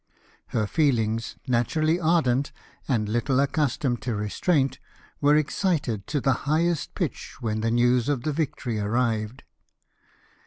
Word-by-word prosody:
Her 110 Hz, -, 0 dB
feelings, 115 Hz, -4 st, 0 dB
naturally 155 Hz, +7 st, +1 dB
ardent, 155 Hz, -6 st, +2 dB, 0.4 s
and 110 Hz, -5 st, +1 dB
little 120 Hz, +5 st, +1 dB
accustomed 140 Hz, -4 st, 0 dB
to 115 Hz, +1 st, -2 dB
restraint, 135 Hz, -, 0 dB, 0.4 s
were 145 Hz, +1 st, +5 dB
excited 150 Hz, -, 0 dB
to 145 Hz, -, 0 dB
the 135 Hz, 0 st, +2 dB, 0.2 s
highest 165 Hz, +1 st, +1 dB
pitch -, -, -4 dB
when 110 Hz, -2 st, -2 dB
the 115 Hz, -, +1 dB
news 120 Hz, +2 st, +3 dB
of 140 Hz, -5 st, 0 dB
the 155 Hz, 0 st, -1 dB
victory 130 Hz, -7 st, -2 dB
arrived. 110 Hz, +2 st, -1 dB
125 Hz, 125 wpm, -25 LUFS, 115-150 Hz, 0.4 s, were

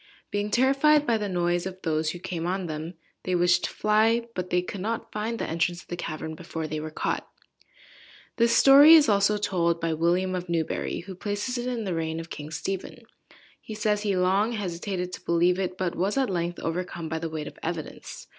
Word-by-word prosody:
Being 205 Hz, 0 st, -1 dB
terrified 275 Hz, +5 st, +4 dB
by 230 Hz, -4 st, +2 dB
the 205 Hz, -1 st, -2 dB
noise 175 Hz, 0 st, 0 dB
of 185 Hz, 0 st, -8 dB
those 155 Hz, -1 st, 0 dB
who 175 Hz, -, -4 dB
came 175 Hz, -2 st, -4 dB
on 185 Hz, +1 st, -1 dB
them, 160 Hz, +2 st, -5 dB, 0.3 s
they 185 Hz, -, -1 dB
wished 175 Hz, 0 st, +3 dB
to -, -, -3 dB
fly, 220 Hz, +2 st, +2 dB
but 180 Hz, -2 st, -4 dB
they 180 Hz, 0 st, +1 dB
could 185 Hz, +1 st, -6 dB
not 225 Hz, +2 st, -3 dB
find 220 Hz, +2 st, -3 dB
the -, -, -2 dB
entrance 170 Hz, +2 st, -1 dB
of -, -, -30 dB
the 175 Hz, -, -3 dB
cavern 160 Hz, -2 st, -5 dB
before 160 Hz, 0 st, -6 dB
they 155 Hz, 0 st, -3 dB
were 155 Hz, +1 st, -5 dB
caught." 155 Hz, -, -3 dB, 1.1 s
This 235 Hz, 0 st, +4 dB
story 285 Hz, +4 st, +9 dB
is 310 Hz, -3 st, +6 dB
also 205 Hz, 0 st, +3 dB
told 170 Hz, -4 st, 0 dB
by 165 Hz, -1 st, -1 dB
William 175 Hz, +4 st, +1 dB
of 180 Hz, -1 st, -4 dB
Newbury, 165 Hz, -2 st, -2 dB
who 190 Hz, +2 st, -9 dB
places 205 Hz, +6 st, -3 dB
it 240 Hz, -, -3 dB
in 240 Hz, -3 st, -2 dB
the 190 Hz, -3 st, -2 dB
reign 160 Hz, 0 st, -2 dB
of 165 Hz, 0 st, -9 dB
King 150 Hz, 0 st, -7 dB
Stephen. 180 Hz, +5 st, -5 dB, 0.6 s
He 215 Hz, -, -8 dB
says 210 Hz, -1 st, 0 dB
he 200 Hz, -3 st, 0 dB
long 195 Hz, +5 st, +2 dB
hesitated 180 Hz, -2 st, -3 dB
to -, -, -7 dB
believe 175 Hz, +2 st, +2 dB
it, 185 Hz, -1 st, -2 dB
but 185 Hz, -2 st, -1 dB
was 195 Hz, +7 st, -1 dB
at 265 Hz, -6 st, +1 dB
length 175 Hz, -1 st, -2 dB
overcome 170 Hz, 0 st, -3 dB
by 160 Hz, +1 st, -3 dB
the 165 Hz, 0 st, -4 dB
weight 155 Hz, -1 st, -5 dB
of -, -, -10 dB
evidence. 165 Hz, -2 st, -6 dB
180 Hz, 210 wpm, -26 LUFS, 170-210 Hz, 1.1 s, story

